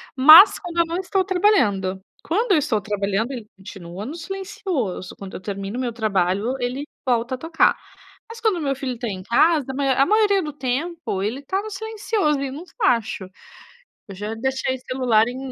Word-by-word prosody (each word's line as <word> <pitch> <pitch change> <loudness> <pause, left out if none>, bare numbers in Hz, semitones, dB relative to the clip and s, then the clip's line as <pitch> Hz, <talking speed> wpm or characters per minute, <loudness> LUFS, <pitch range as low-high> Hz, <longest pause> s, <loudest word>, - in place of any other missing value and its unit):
mas 310 +9 +9
quando 345 -2 -8
eu 335 - +4
não 335 +1 -3
estou 380 +1 0
trabalhando. 245 - +2 0.2
Quando 405 +5 +1
eu - - +5
estou 255 -8 0
trabalhando 205 +3 -1
ele 235 -5 -7
continua 190 0 -9
no 285 +7 -6
silencioso, 345 - -4
quando 195 -1 -9
eu - - -7
termino 200 +3 -5
o - - -2
meu 240 -2 -2
trabalho 205 +1 0
ele 250 +4 -3 0.2
volta 245 0 0
a - - -10
tocar. 325 +4 +2 0.5
Mas 455 0 -9
quando 435 -5 +2
o - - -4
meu 275 -2 -1
filho 260 -2 -4
tá 235 - -4
em 190 -2 -5
casa, 295 - +3
a - - -8
maior 270 -2 +1
a 275 - +5
maioria 415 +1 +3
do 300 -2 -5
tempo, 275 - -3
ele 230 +8 -3
tá 380 +8 -1
no 435 - -7
silencioso, 420 -7 -1
ele 275 -1 -3
não 300 +6 -7
f - - -20
acho. 225 - +1 0.8
Eu 195 - -9
já 210 +3 -5
deixei 260 +2 -1
o - - -10
celular 245 -4 +3
em 245 - -5
265 Hz, 200 wpm, -22 LUFS, 215-340 Hz, 0.8 s, mas